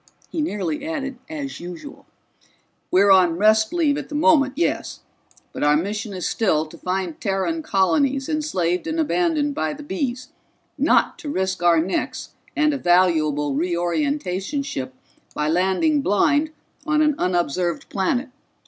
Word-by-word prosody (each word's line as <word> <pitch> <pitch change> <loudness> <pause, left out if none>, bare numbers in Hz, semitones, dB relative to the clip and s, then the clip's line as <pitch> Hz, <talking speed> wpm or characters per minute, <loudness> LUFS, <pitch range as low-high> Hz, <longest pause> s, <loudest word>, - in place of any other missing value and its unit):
He 320 - -2
nearly 200 - -2
added 275 -5 -4
as 290 -3 -5
usual. 180 - -9 0.8
"We're 195 +2 +4
on 180 -3 +5
rest 215 +2 +4
leave 305 -5 +1
at 290 - -8
the 295 - -6
moment, 295 -3 +4
yes, 340 - -2 0.5
but - - -6
our 150 0 +4
mission 205 +5 -3
is 185 -2 -3
still 160 -8 +1
to 160 +2 -13
find 185 -3 -3
Terran 200 - -1
colonies 270 +3 +1
enslaved 195 - -1
and 320 +1 -2
abandoned 315 -2 +1
by 155 - -2
the 295 - -9
Bees, 255 +1 -3 0.5
not - - +2
to 315 -4 -6
risk 190 -7 -2
our 170 -1 +4
necks 180 +4 -3 0.2
and 300 0 +2
a 280 - -3
valuable 155 - +2
Reorientations 185 - -1
ship 130 - -5 0.4
by 150 - -1
landing 190 - +2
blind 290 +8 +2 0.3
on 305 -1 +2
an 305 0 +3
unobserved 175 -1 -1
planet. 245 +8 -1
205 Hz, 145 wpm, -22 LUFS, 175-295 Hz, 0.8 s, on